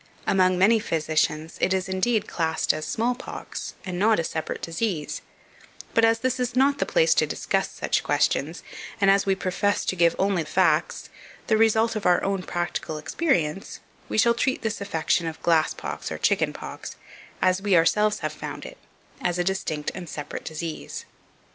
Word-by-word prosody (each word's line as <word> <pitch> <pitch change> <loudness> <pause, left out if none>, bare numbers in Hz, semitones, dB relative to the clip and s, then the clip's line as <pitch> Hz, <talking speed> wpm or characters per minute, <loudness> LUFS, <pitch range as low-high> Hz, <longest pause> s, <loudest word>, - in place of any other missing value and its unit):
Among 185 -1 +3
many 215 +5 +5
physicians 160 -4 -1
it 190 - +3
is, 190 0 -2
indeed, 195 +4 0
classed 160 -2 0
as 155 -1 -4
small 230 +10 0
pox, 245 - -7
and 180 -1 -4
not 220 +2 +4
a 165 - 0
separate 160 0 -4
disease; 165 -2 -2 0.7
but 230 - +3
as 225 0 +4
this 255 +1 0
is 250 -1 -1
not 280 +2 +3
the - - 0
place - - +4
to - - +2
discuss - - -1
such - - -1
questions, - - 0 0.4
and 195 -1 +5
as 200 0 +2
we 195 - +3
profess 190 +2 0
to - - 0
give 170 -1 +3
only 195 -3 +1
facts, 155 - +1 0.3
the 220 - +2
result 225 +1 +3
of 215 - -1
our 175 -1 +4
own 195 -1 0
practical 175 -3 -3
experience, 160 - -1 0.3
we - - -2
shall 235 +2 +5
treat 255 +2 -1
this 220 -2 -2
affection 170 -3 0
of 160 0 -5
glass 165 -2 +3
pox - - -5
or - - -3
chicken - - +2
pox, - - -8 0.4
as 185 +1 +2
we 200 -3 +3
ourselves 210 +6 +3
have - - -2
found - - -7
it, - - -10 0.4
as 175 0 0
a 175 - +1
distinct 175 -5 -2
and 175 -3 -7
separate 145 -1 -6
disease. 160 0 -5
190 Hz, 180 wpm, -25 LUFS, 165-220 Hz, 0.7 s, many